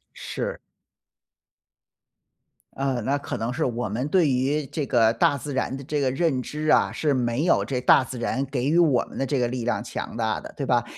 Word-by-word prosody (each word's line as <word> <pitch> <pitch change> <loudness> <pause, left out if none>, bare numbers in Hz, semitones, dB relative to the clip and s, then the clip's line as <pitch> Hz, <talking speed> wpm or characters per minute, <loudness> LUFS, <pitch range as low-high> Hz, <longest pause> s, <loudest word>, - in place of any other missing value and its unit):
是。 - - -4 2.2
嗯， 135 -4 -1
那 140 +2 +1
可 - - -5
能 115 +2 -2
是 155 +5 -1
我 120 -2 -2
们 120 +7 -2
对 170 -1 +3
于 135 +4 +1
这 145 +1 -3
个 115 -2 +4
大 145 +4 +3
自 140 +2 -6
然 130 0 -1
的 135 - -8
这 145 +2 -2
个 135 -2 +1
认 145 -3 +1
知 155 +3 -4
啊， - - +4
是 150 -2 0
没 125 +2 0
有 175 - +3
这 130 -2 -2
大 130 +1 +5
自 125 0 -7
然 130 +3 -1
给 130 -2 -3
予 165 - +3
我 155 -8 +4
们 - - -10
的 135 - 0
这 135 +1 0
个 120 -1 +1
力 125 -1 -3
量 120 - 0
强 - - -6
大 110 -2 0
的， - - -10
对 140 - -3
吧？ 120 -2 +2
130 Hz, 230 characters per minute, -24 LUFS, 120-145 Hz, 2.2 s, 大